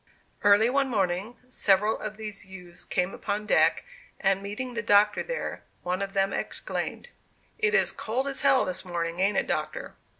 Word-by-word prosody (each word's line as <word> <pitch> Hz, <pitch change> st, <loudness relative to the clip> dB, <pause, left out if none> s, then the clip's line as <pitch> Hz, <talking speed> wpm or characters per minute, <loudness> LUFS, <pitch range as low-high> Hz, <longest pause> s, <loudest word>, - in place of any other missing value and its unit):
Early 205 Hz, +2 st, +6 dB
one 270 Hz, +2 st, +1 dB
morning, 195 Hz, +1 st, -1 dB
several 210 Hz, -3 st, +2 dB
of 215 Hz, 0 st, -6 dB
these 210 Hz, -2 st, -5 dB
youths 180 Hz, -2 st, -11 dB
came 180 Hz, +1 st, -1 dB
upon 210 Hz, +1 st, -3 dB
deck, -, -, +3 dB, 0.4 s
and, 195 Hz, -1 st, +2 dB
meeting 210 Hz, +6 st, -5 dB
the 230 Hz, -, -2 dB
Doctor 210 Hz, -1 st, +4 dB
there, -, -, -4 dB, 0.2 s
one 180 Hz, +2 st, -1 dB
of 195 Hz, 0 st, -3 dB
them 195 Hz, 0 st, +1 dB
exclaimed: -, -, -3 dB, 0.5 s
"It 445 Hz, 0 st, +2 dB
is -, -, +4 dB
cold 250 Hz, +5 st, -2 dB
as 275 Hz, -, -2 dB
hell 265 Hz, -, +4 dB
this 185 Hz, -1 st, -3 dB
morning, 170 Hz, -1 st, -3 dB
ain't 195 Hz, +2 st, +2 dB
it, -, -, +2 dB
Doctor?" -, -, -3 dB
205 Hz, 170 wpm, -27 LUFS, 190-230 Hz, 0.5 s, Early